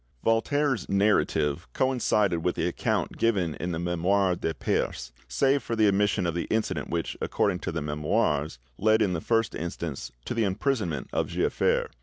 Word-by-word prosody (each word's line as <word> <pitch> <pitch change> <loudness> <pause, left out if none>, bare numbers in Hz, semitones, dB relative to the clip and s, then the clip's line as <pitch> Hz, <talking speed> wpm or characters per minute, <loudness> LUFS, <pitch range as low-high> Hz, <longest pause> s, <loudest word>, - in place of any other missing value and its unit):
Voltaire's 130 +3 +1
narrative 100 -7 +1
coincided 110 -8 +1
with 90 +2 -1
the 80 - 0
account 90 - -1
given 95 -8 +1
in 90 +3 -4
the 80 - -2
'Memoires 90 +2 +1
de - - -1
Peyse', - - -2 0.2
save 140 0 +2
for 115 - -3
the 110 -1 +4
omission 100 -1 +2
of 85 - 0
the 85 - -2
incident 110 0 -1
which, 85 0 -2
according 95 -3 0
to - - -4
the 80 -2 -3
'Memoires', 75 - 0 0.2
led 110 +1 +4
in 95 -3 0
the 80 - -2
first 115 +2 +1
instance 80 -6 -5
to - - -3
the 115 -1 +1
imprisonment 100 - -1
of - - 0
Giafer. - - 0
95 Hz, 170 wpm, -27 LUFS, 85-110 Hz, 0.2 s, the